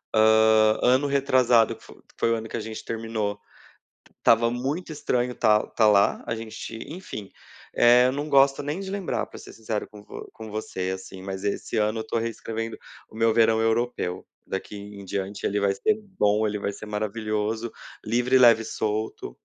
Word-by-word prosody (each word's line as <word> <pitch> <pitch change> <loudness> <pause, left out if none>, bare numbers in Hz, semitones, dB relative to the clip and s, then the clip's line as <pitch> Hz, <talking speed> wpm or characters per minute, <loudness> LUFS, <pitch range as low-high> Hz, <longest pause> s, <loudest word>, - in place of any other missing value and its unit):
Hã, 110 0 +5
ano 130 +3 +3
retrasado, 130 -4 +3
que - - -20
f - - -13 0.3
foi 115 - +2
o - - +3
ano 115 0 -5
que - - -4
a - - -3
gente 110 0 -7
terminou, 110 -3 -3 0.8
estava 115 0 +4
muito 140 +8 -3
estranho 125 -4 -1
estar 110 -3 +3
estar 110 -2 +2
lá, 100 -1 +3
a - - -1
gente, 115 0 -7 0.2
enfim, 155 - -8 0.5
eh, 125 +1 +6
eu - - +1
não 145 +3 -3
gosto 140 -1 +4
nem 145 +6 -3
de 195 - -6
lembrar, 195 -3 -2
para - - -12
ser - - -12
sincero 110 -1 -4
com 105 -1 -14
vo - - -9
com 110 -1 -9
você, 95 -3 -4
assim, 95 0 -10
mas 95 0 -6
esse 100 +3 -2
ano 110 +1 +1
eu - - -1
estou 110 +1 -2
reescrevendo 115 0 -4 0.3
o - - -16
meu 115 0 +3
verão 115 -1 +4
europeu. 115 -5 -1 0.2
Daqui 95 +2 -5
em 100 0 -10
diante 100 +1 -4
ele 105 +1 0
vai 100 -1 +2
ser 215 - +1 0.2
bom, 105 +1 +3
ele 105 0 -2
vai 100 - -2
ser 105 - -9
maravilhoso, 110 +1 -2 0.4
livre 125 +2 +2
leve 115 -3 +7
e 115 - -7
solto. 110 - -3
110 Hz, 190 wpm, -25 LUFS, 105-120 Hz, 0.8 s, leve